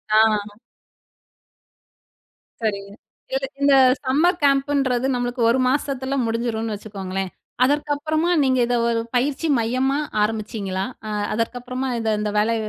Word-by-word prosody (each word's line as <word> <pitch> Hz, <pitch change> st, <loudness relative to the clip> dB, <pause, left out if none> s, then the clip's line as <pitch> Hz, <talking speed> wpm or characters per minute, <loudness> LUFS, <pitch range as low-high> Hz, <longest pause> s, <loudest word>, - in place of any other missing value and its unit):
ஆ. 210 Hz, -2 st, +3 dB, 2.1 s
சரிங்க. 200 Hz, -2 st, -2 dB, 0.4 s
இதுல, 270 Hz, 0 st, -1 dB, 0.2 s
இந்த 280 Hz, 0 st, +5 dB, 0.3 s
சம்மர் 320 Hz, +7 st, +3 dB
கேம்ப் 275 Hz, 0 st, +3 dB
ன்றது 260 Hz, -1 st, +1 dB
நம்மளுக்கு 245 Hz, 0 st, -2 dB
ஒரு 255 Hz, +3 st, +3 dB
மாசத்தில 275 Hz, 0 st, -1 dB
முடிஞ்சிருன்னு 225 Hz, -1 st, -2 dB
வச்சுக்கோங்களேன்! 195 Hz, -2 st, -5 dB, 0.3 s
அதற்கு 290 Hz, +3 st, +1 dB
அப்பறமா 315 Hz, +3 st, -1 dB
நீங்க 260 Hz, -1 st, +2 dB
இத 245 Hz, -, +1 dB
ஒரு 230 Hz, -1 st, +1 dB, 0.2 s
பயிற்சி 280 Hz, +5 st, 0 dB
மையமா 255 Hz, +4 st, 0 dB, 0.2 s
ஆரம்பிச்சீங்களா? 210 Hz, -3 st, -2 dB, 0.2 s
அ, -, -, -4 dB, 0.2 s
அதற்கு 230 Hz, +2 st, -1 dB
அப்பறமா 255 Hz, +1 st, -4 dB
இத 220 Hz, -1 st, 0 dB
இந்த 210 Hz, 0 st, -1 dB
வேலை, 230 Hz, +2 st, +2 dB
245 Hz, 125 wpm, -22 LUFS, 215-270 Hz, 2.1 s, இந்த